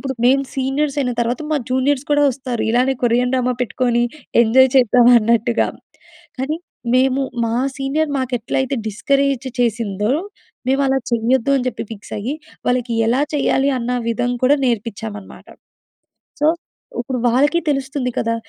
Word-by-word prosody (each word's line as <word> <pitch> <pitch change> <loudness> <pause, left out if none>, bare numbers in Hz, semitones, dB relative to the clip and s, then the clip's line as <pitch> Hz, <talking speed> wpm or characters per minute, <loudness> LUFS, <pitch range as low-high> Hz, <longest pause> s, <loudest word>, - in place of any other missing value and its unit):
ఇప్పుడు, 265 -2 -4
మేము 275 +2 +3
సీనియర్స్ 275 +2 -1
అయిన 250 -3 -1
తర్వాత, 240 +5 -2
మా 300 - +2
జూనియర్స్ 260 +2 +1
కూడా 290 0 +4
వస్తారు. 255 -2 -4
ఇలానే, 255 +3 +2
కొరియన్ 245 +2 +2
డ్రామా 250 -1 +1
పెట్టుకోని, 240 0 0 0.4
ఎంజాయ్ 260 +3 +5
చేద్దాం 245 -1 +5
అన్నట్టుగా. 230 +1 +1 0.7
కాని 295 +5 -2 0.4
మేము, 265 +1 +2 0.2
మా 225 - -1 0.2
సీనియర్ 290 +3 -1
మాకెట్లైతే, 260 +1 -1
డిస్కరేజ్ 275 +3 0
చేసిందో, 220 -1 0 0.6
మేవలా 270 0 +2
చేయ్యొద్దు, 235 +3 +1
అని 250 - -3
చెప్పి 235 - -5
ఫిక్స్ 205 - -11
అయి, 250 +8 -3 0.3
వాళ్ళకి 245 -1 0 0.2
ఎలా 255 +4 +2
చేయ్యాలి? 275 -1 +2
అన్న 240 0 -3 0.2
విధం 245 +2 -1
కూడా, 280 - +5
నేర్పిచ్చామనమాట. 220 -3 -4 0.9
సో, 295 - +3 0.5
ఉప్పుడు 250 +1 -3
వాళ్ళకీ 290 +8 +3
తెలుస్తుంది 270 -2 -1
కదా! 230 0 0
255 Hz, 135 wpm, -19 LUFS, 235-270 Hz, 0.9 s, ఎంజాయ్